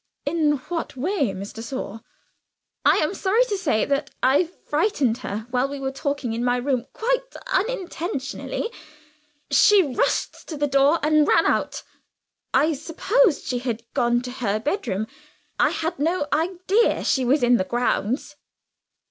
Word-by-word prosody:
"In 300 0 +2 0.2
what 335 -5 -3
way, 290 - 0
Miss 195 +1 -7
de 225 - -7
Sor?" 230 -3 -5 0.8
"I - - +5
am 310 +5 +1
sorry 415 +5 +2
to 420 - -2
say 315 - 0 0.4
I 280 +7 +4
frightened 300 - -1
her 215 +2 -5
while 255 +2 +1
we 285 0 -5
were 265 0 -2
talking 280 -3 -2
in 235 +1 -2
my 245 0 +2
room 250 -1 -1
quite - - 0 0.3
unintentionally. 375 - -2 0.8
She 415 -3 +6
rushed - - -1
to 310 - -5
the 290 - +1
door 275 +3 +4
and 305 0 +4
ran 330 - +4
out. - - 0 0.7
I 315 +2 +3
supposed 355 - +1
she 250 -2 -1
had 235 -2 -3
gone 240 0 +2
to 250 - -5
her 225 -5 -1
bedroom; 220 - -2 0.5
I - - +5
had 325 -2 -3
no 325 +1 +1
idea 370 +8 +1
she 265 - +2
was 255 +2 +2
in 245 0 +5
the 185 - +1
grounds." 245 +5 -1
285 Hz, 150 wpm, -23 LUFS, 245-350 Hz, 0.8 s, She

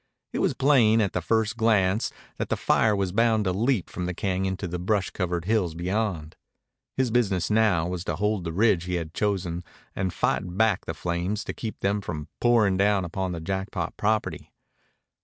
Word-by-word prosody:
It - - -1
was - - +1
plain 120 -6 +4
at 100 -4 +1
the 90 - -1
first 110 +4 0
glance 110 -3 +2 0.3
that - - -3
the - - 0
fire 110 -2 +3
was 95 -2 -1
bound 110 +1 +3
to 95 - 0
leap 115 0 +1
from 90 -1 -4
the 90 - -3
cañon 95 0 -1
to 95 - -4
the 90 +1 -4
brush 95 +1 0
covered 90 -2 -2
hills 95 -6 +1
beyond. 90 -3 -2 0.6
His 130 -3 +1
business 105 -6 +1
now 105 -7 +3
was 90 -1 -3
to - - -1
hold 105 -2 0
the 85 - -3
ridge 95 -2 +2
he 90 0 -2
had 80 -2 -4
chosen 90 -4 -1 0.3
and 95 -1 -1
fight 90 +2 -1
back 110 -3 +2
the - - -4
flames 90 +4 -2
to - - -5
keep 110 -2 -6
them 100 +1 +1
from 80 -6 -6
pouring 110 -6 +3
down 100 -1 +2
upon 95 +2 -3
the 85 - -4
Jackpot 95 -1 -3
property. 110 +1 -1
95 Hz, 195 wpm, -26 LUFS, 90-110 Hz, 0.6 s, plain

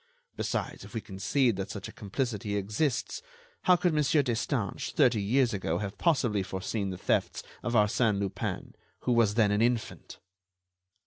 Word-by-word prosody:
Besides, - - -3
if - - -12
we 110 - -1
concede 110 +4 0
that 95 0 -4
such 100 -2 -6
a - - -9
complicity 105 -1 -3
exists, 110 - -1 0.4
how 180 - +7
could 175 -1 +1
Mon. 150 - +3
Destange, 140 -5 0
thirty 120 -4 +4
years 120 +4 +2
ago, 85 -4 -1
have 100 +1 -5
possibly 125 - +2
foreseen 95 +2 -3
the 95 - -5
thefts - - 0 0.2
of 120 - -3
Arsène 105 0 +3
Lupin, 100 -1 -3 0.3
who 125 - 0
was 115 -3 +3
then 110 -3 +4
an 105 +1 +2
infant?" 120 -1 -1
110 Hz, 155 wpm, -29 LUFS, 100-125 Hz, 0.4 s, how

